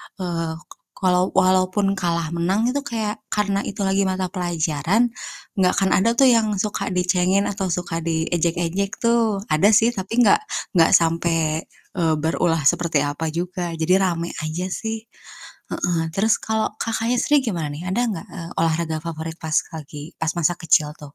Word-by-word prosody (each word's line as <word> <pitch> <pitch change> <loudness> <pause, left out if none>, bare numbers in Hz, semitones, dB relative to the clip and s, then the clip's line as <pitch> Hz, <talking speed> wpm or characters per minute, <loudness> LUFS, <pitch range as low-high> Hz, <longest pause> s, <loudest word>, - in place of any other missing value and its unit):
eee, 165 -4 -3
ka 165 - -15 0.2
kalau 180 -1 +2
walaupun 185 +1 +3
kalah 170 -3 -1
menang 190 +7 +1
itu - - +2
kayak 220 -2 -3
karena 200 -1 0
itu 200 0 -4
lagi 195 +1 +2
mata 185 0 -1
pelajaran, 175 - 0 0.5
enggak 180 -1 +4
akan 195 -1 +1
ada 225 +5 +3
tuh 270 +2 +5
yang 225 -4 +3
suka 210 0 -2
dicengin, 180 +2 +2
atau 195 -1 -3
suka 170 -1 -2
diejek-ejek 170 +4 -1
tuh, 230 -3 +2
ada 155 +6 +4
sih 230 +2 +4
tapi 200 +4 -2
nggak 205 - +5 0.4
nggak 165 -2 +5
sampai, 165 -1 +1 0.4
eee, 160 -2 +2
berulah 160 +1 0
seperti 155 0 +2
apa 145 +3 -3
juga 175 +1 -3
jadi 185 +4 +3
rame 170 0 -4
aja 165 +4 -3
sih, 220 +3 -3 0.7
heeh. 175 -2 0
Terus 220 +3 +2
kalau 220 0 -1
Kakaknya 230 +2 -1
sendiri 295 +4 +3
gimana 165 -5 -3
nih? 155 - -7
Ada 225 +6 +1
nggak, 190 -8 -5
eee, 165 0 -7
olahraga 160 0 0
favorit 160 -1 -5
pas 160 -2 -2 0.2
lagi 150 0 -9
pas 160 0 0
masa 170 +1 +2
kecil 155 -3 +3
tuh? - - -29
180 Hz, 160 wpm, -22 LUFS, 165-200 Hz, 0.7 s, tuh